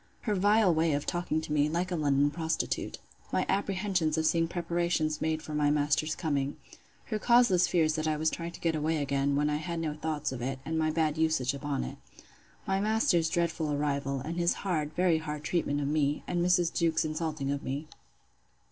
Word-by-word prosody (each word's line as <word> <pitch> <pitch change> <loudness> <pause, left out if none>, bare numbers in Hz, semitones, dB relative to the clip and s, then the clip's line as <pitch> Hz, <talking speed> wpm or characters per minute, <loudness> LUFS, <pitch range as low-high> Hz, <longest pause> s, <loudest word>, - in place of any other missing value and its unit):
Her 215 - -1
vile 205 0 +4
way 160 -1 +2
of 145 0 -1
talking 175 -2 -1
to 155 - -4
me, 150 0 +3
like 175 +3 -1
a - - 0
London 145 -2 +2
prostitute. 160 0 -2 0.3
My - - +1
apprehensions 190 -5 0
of 160 - +1
seeing 165 +1 +2
preparations 170 -2 -1
made 155 0 -1
for 155 - -7
my 150 -1 +2
master's 150 +1 +1
coming. 145 -4 -1 0.5
Her 215 -2 -3
causeless 215 -7 +4
fears 160 -3 +2
that 155 0 -1
I 155 -1 +1
was 155 +1 +1
trying 170 0 -5
to - - -10
get 165 -1 0
away 155 +1 0
again, 140 -1 0
when 145 +1 +2
I 150 0 0
had 170 +2 -4
no 160 -2 -2
thoughts 150 -2 -3
of 130 -2 -5
it; 135 +2 -2
and 160 - -2
my 155 0 +2
bad 155 -1 0
usage 155 -5 +1
upon 140 -1 -2
it. - - -7 0.7
My 195 0 0
master's 210 - +2
dreadful 170 -3 0
arrival; 140 -2 -1
and 165 +5 -5
his 170 0 +2
hard, 155 -6 0
very 175 -3 +3
hard 150 -1 -5
treatment 150 -3 0
of 140 - -1
me; 145 -1 0
and 175 -1 -1
Mrs. 180 -1 +2
Jewkes's 165 -1 +1
insulting 155 -3 -2
of 140 0 -2
me. 140 +4 -4
160 Hz, 200 wpm, -29 LUFS, 150-170 Hz, 0.7 s, vile